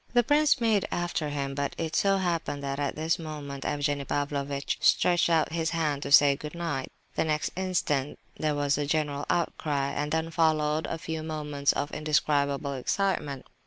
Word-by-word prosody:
The 240 - +6
prince 290 +2 +3
made 220 -5 +2
after 175 -3 -1
him, 140 -1 -3
but 140 0 -2
it 160 -1 -3
so 195 -1 +3
happened 170 -6 -2
that 140 0 -3
at 140 -1 -1
this 160 +2 0
moment 145 -4 -6
Evgenie 145 -1 0
Pavlovitch 140 0 -2
stretched 175 -1 +4
out 160 -1 +2
his 165 -1 0
hand 150 -3 0
to 140 - -5
say 140 -1 +7
good 150 +3 -8
night. 165 -6 -3 0.2
The - - +1
next 155 -1 -1
instant 170 -7 -1 0.2
there 155 -1 -1
was 145 0 +1
a 145 - -1
general 145 -1 -1
outcry, 145 -5 0
and 150 0 -2
then 160 +1 -1
followed 155 -1 +2
a 165 - -3
few 160 0 -4
moments 150 -3 -1
of 145 - -2
indescribable 145 -2 +1
excitement. 140 -1 -1
150 Hz, 175 wpm, -28 LUFS, 140-165 Hz, 0.2 s, say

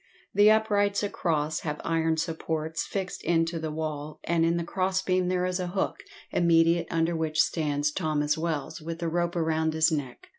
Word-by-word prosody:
The 205 +2 +6
uprights 205 -2 +2
across 155 -6 -1
have 150 -2 -4
iron 160 -1 +1
supports 160 -1 -2
fixed 190 -2 -4
into 165 0 +1
the 160 0 -3
wall, 155 -1 -4
and 170 -1 +1
in 165 +1 +2
the 170 - -1
crossbeam 185 0 0
there 180 0 +1
is 185 0 -1
a 180 - -2
hook, 190 +2 -1 0.3
immediate 170 0 +3
under 165 +1 +1
which 160 -1 -1
stands 150 -2 +1
Thomas 150 -3 0
Wells, 160 -3 -3
with 165 +1 -5
the 170 -1 -2
rope 175 +1 -1
round 160 -1 +1
his 160 +1 +4
neck. 140 -5 -4
165 Hz, 175 wpm, -27 LUFS, 155-180 Hz, 0.3 s, The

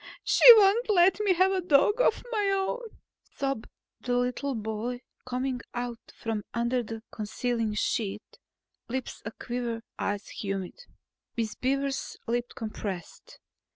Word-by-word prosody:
"She - - +1 0.2
won't 425 +4 +4
let 370 -1 +5
me 410 -3 +3
have 370 +2 +4
a 380 -1 0
dog 355 - +4
of 455 - +2
my 415 -4 +1
own," 390 +5 -1 0.5
sobbed 275 -4 -2 0.3
the 250 +3 -1
boy, 220 +3 -3 0.3
coming 255 0 -2
out 240 -1 -3 0.2
from 225 -2 -3
under 235 +2 +1
the 225 -1 -7
concealing 225 0 -2
sheet, 210 -1 -2 0.5
lips 260 +1 -4
a 210 - -4
quiver, 235 -1 -4 0.2
eyes 205 0 -2
humid. 195 - -5 0.5
Miss 225 -2 -1
Beaver's 275 +1 -2
lips 240 +1 -2
compressed. 205 -5 -6
245 Hz, 125 wpm, -28 LUFS, 225-335 Hz, 0.5 s, let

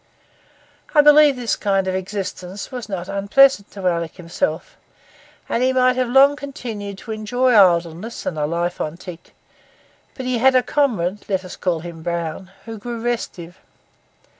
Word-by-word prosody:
I 295 - +8
believe 295 -1 +6
this 245 -2 -1
kind 195 -2 0
of 185 - -1
existence 190 +1 -5
was 245 -4 -7
not 185 -3 -4
unpleasant 200 +3 +3
to 195 -2 -7
Alick 170 -2 -1
himself, 170 -3 -3 0.7
and 235 - -1
he 255 +1 +3
might 255 0 +3
have 255 -1 0
long 275 +3 +6
continued 225 -8 -7
to 225 - -9
enjoy 220 +4 0
idleness 175 +1 +2
and 170 - -2
a 150 -1 -1
life 170 +2 -2
on 155 +2 -4
tick; 180 -2 -11 0.8
but 260 - -6
he 250 -2 0
had 265 +2 +4
a 255 - +4
comrade, 210 - -1
let 190 -1 -1
us 185 - -8
call 175 -4 -1
him 170 -1 -9
Brown, 170 +2 -4 0.2
who 225 -2 -7
grew 235 +2 -6
restive. 190 -7 -4
200 Hz, 165 wpm, -20 LUFS, 175-250 Hz, 0.8 s, I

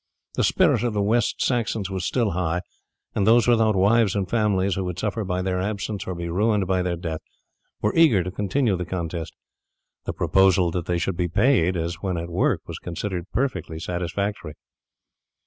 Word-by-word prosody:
The - - 0
spirit - - +3
of 120 -2 0
the 105 - 0
West 115 +2 +1
Saxons 115 -5 -1
was 95 -2 -2
still 120 -5 +1
high, 85 0 -1 0.5
and 100 -1 0
those 115 +2 +5
without 110 -3 +4
wives 105 +1 +3
and 100 -2 -1
families 100 -2 +1
who 95 - -2
would 90 -2 -4
suffer 105 +1 -2
by 90 -1 -2
their 90 -1 -1
absence 100 0 -3
or 90 - -3
be 85 0 -4
ruined 105 +3 +1
by 95 0 +1
their 90 -1 -1
death 80 -2 -5 0.6
were 105 - +2
eager 140 - +5
to 90 - -5
continue 105 +3 0
the 90 - -3
contest. 85 -2 -4 0.7
The - - -3
proposal 95 -2 +3
that 90 0 -3
they 90 - +1
should 85 +1 -2
be 90 -1 0
paid 95 -2 +2
as 85 +1 -3
when 95 -3 -2
at 85 +1 -5
work - - +1
was - - -7
considered 90 +1 -5
perfectly 120 -9 -2
satisfactory. 90 0 -3
95 Hz, 185 wpm, -24 LUFS, 90-105 Hz, 0.7 s, those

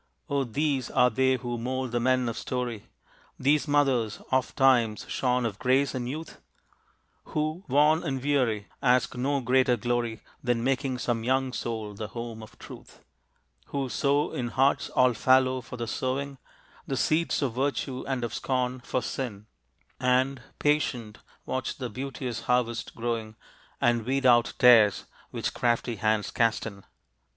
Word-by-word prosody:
O 140 -1 +2
these 135 +1 -1
are 125 0 +3
they 130 +3 +2
who 120 -2 -4
mold 130 +1 -3
the 120 - 0
men 130 0 +2
of 115 - -2
story, 125 -4 -4 0.5
These 145 +3 +2
mothers, 135 -7 +2
ofttimes 130 -4 +2
shorn 125 -1 0
of 105 -4 -3
grace 130 +2 +2
and 125 -2 -3
youth, 155 +4 -7 0.8
Who, 155 +4 -3
worn 150 +4 +4
and 135 -5 -2
weary, 125 -7 0 0.2
ask 125 -2 +3
no 135 +3 0
greater 125 0 +3
glory 120 -1 -2 0.2
Than 120 -2 0
making 135 0 0
some 120 -2 -1
young 130 +1 +1
soul 110 -4 -4
the 105 +1 -6
home 115 0 -7
of 110 - -13
truth, - - -13 0.6
Who 135 -2 -3
sow 145 +4 +1
in 120 - -3
hearts 135 +3 +1
all 125 -1 +3
fallow 130 +3 +3
for 125 +1 -9
the 120 - -3
sowing 135 +3 -3 0.5
The 135 - -2
seeds 155 +2 +1
of 130 -4 -1
virtue 135 0 -2
and 130 -3 -2
of 115 - -3
scorn 130 -1 -1
for 125 +1 -2
sin, 105 -6 -4 0.5
And, 130 +1 +1 0.2
patient, 125 -7 0 0.3
watch 130 - -3
the 125 -4 -5
beauteous 130 -1 -5
harvest 120 -2 0
growing 115 -2 -3 0.4
And 120 -1 +2
weed 135 +3 -1
out 120 -1 +5
tares 115 -5 +6 0.2
which - - -3
crafty 120 -1 0
hands 110 +1 0
cast 115 -1 +1
in. 100 -3 -8
125 Hz, 150 wpm, -27 LUFS, 115-135 Hz, 0.8 s, tares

